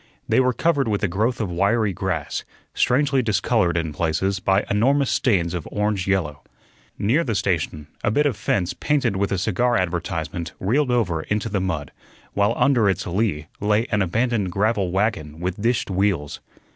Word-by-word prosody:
They - - +3
were 130 0 +3
covered 145 0 +1
with 105 -2 -1
a - - +3
growth 110 +7 0
of 105 -5 -2
wiry 100 +4 +1
grass, 95 -1 -3 0.3
strangely 135 +1 +2
discolored 105 -5 +1
in 80 -2 -2
places 85 +5 0
by 95 +2 +2
enormous 135 +6 +2
stains 90 -9 +1
of 85 -4 -4
orange 105 -3 -1
yellow. 85 -7 0 0.6
Near 125 +12 +2
the 115 -7 -2
station 80 -5 -1 0.2
a - - +2
bit 145 +8 +2
of 140 -6 +1
fence 95 -3 -1
painted 145 -8 0
with 100 +1 -1
a 95 - +1
cigar 115 +6 +1
advertisement 85 -1 -3
reeled 130 +8 +1
over 100 -10 +1
into 105 +5 -2
the 100 -2 -1
mud, 80 -7 -3 0.4
while 105 +3 +2
under 120 -7 +3
its 95 - -1
lee 90 -5 -1
lay 105 +2 +2
an 105 -2 +2
abandoned 110 +1 0
gravel 100 -1 +1
wagon 90 -6 -1
with 90 +3 -3
dished 115 -2 0
wheels. 95 -6 0
100 Hz, 170 wpm, -22 LUFS, 90-115 Hz, 0.6 s, They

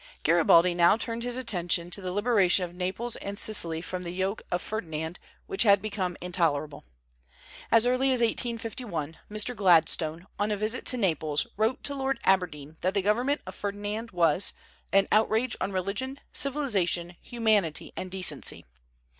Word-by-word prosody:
Garibaldi 170 +2 +5
now 175 +4 +4
turned 230 0 -4
his 245 +1 -1
attention 175 -7 -1
to 200 - -2
the 185 -1 -4
liberation 200 -3 +2
of 175 - -11
Naples 190 +6 -2
and 200 0 -6
Sicily 170 -7 +3
from 180 0 -5
the 175 - -6
yoke 190 +4 -2
of 175 - 0
Ferdinand, 165 -5 -5 0.3
which 390 - -2
had 200 -3 +6
become 195 -4 -3
intolerable. 160 -5 -1 0.9
As 230 0 +5
early 255 +2 +2
as 255 - +3
1851, 225 - -2
Mr. 215 +4 0
Gladstone, 165 -3 +3
on 205 +1 0
a 210 - -1
visit 215 +4 -1
to 255 - +2
Naples, 155 -8 +1
wrote 220 +4 0
to 285 - -2
Lord 270 -2 -2
Aberdeen 160 -5 0
that 185 +2 0
the 200 - +1
government 245 +8 +1
of - - -8
Ferdinand 205 +3 -4
was 175 -1 +3 0.4
"an 195 0 +4
outrage 220 +3 +2
on 190 - -1
religion, 200 +9 -2
civilization, 200 - -1
humanity, 215 -9 0
and 185 - -5
decency." 185 -1 -1
195 Hz, 155 wpm, -27 LUFS, 175-230 Hz, 0.9 s, had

